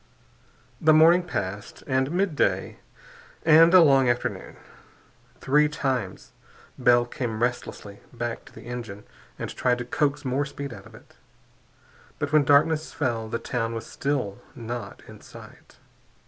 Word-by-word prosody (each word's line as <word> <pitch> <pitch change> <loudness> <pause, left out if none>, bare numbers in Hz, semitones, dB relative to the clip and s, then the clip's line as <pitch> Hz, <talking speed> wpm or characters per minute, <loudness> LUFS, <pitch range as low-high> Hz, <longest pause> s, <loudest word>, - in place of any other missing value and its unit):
The 155 0 +5
morning 165 +3 +6
passed, 100 - -6
and 130 0 0
midday, 180 -3 0 0.7
and 165 +1 +7
a 185 -2 +8
long 135 -4 +4
afternoon. 120 0 -3 0.8
Three 150 +3 +3
times 130 -10 -3 0.4
Bell 120 -1 +3
came 120 -2 -4
restlessly 105 -4 -4
back 120 -1 -5
to - - -16
the - - -13
engine 115 -4 -7 0.3
and - - -6
tried 125 -1 +1
to 120 - -5
coax 145 +3 -1
more 130 +2 0
speed 140 -3 -7
out 100 -3 -12
of - - -16
it. - - -19 1.0
But 145 -1 -3
when 150 -2 +4
darkness 150 +3 +3
fell 115 -3 -2
the 115 - -2
town 115 -1 -3
was 115 0 -6
still 135 -9 -3 0.2
not 120 -3 -7
in - - -13
sight. - - -15
125 Hz, 140 wpm, -25 LUFS, 115-150 Hz, 1.0 s, a